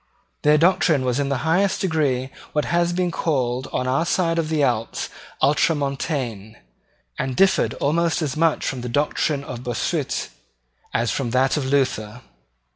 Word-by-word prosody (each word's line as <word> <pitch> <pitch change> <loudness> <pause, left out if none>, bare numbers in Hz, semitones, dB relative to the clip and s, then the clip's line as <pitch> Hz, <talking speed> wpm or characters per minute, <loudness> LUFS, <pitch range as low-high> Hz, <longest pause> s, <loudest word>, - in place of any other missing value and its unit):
Their 150 +1 +5
doctrine 160 -4 +3
was 125 +1 0
in 140 -1 0
the 140 +2 -2
highest 190 +4 +2
degree 140 -7 0 0.2
what 150 - +1
has 170 0 +1
been 180 0 0
called 130 -6 -1
on 125 - -1
our 135 +5 +2
side 170 -1 +1
of 155 -2 -1
the 155 -2 +1
Alps 115 -4 -1 0.3
Ultramontane, 140 - 0 0.6
and 130 -1 -2
differed 195 +4 +3
almost 165 +3 +1
as 140 -4 -2
much 160 0 +1
from 130 -3 -2
the 125 - -5
doctrine 145 +2 0
of 125 -3 -7
Bossuet 120 -2 -2 0.6
as 115 0 0
from 135 -4 -2
that 130 +2 +2
of 145 -3 -1
Luther. 125 -4 0
140 Hz, 155 wpm, -22 LUFS, 125-165 Hz, 0.6 s, Their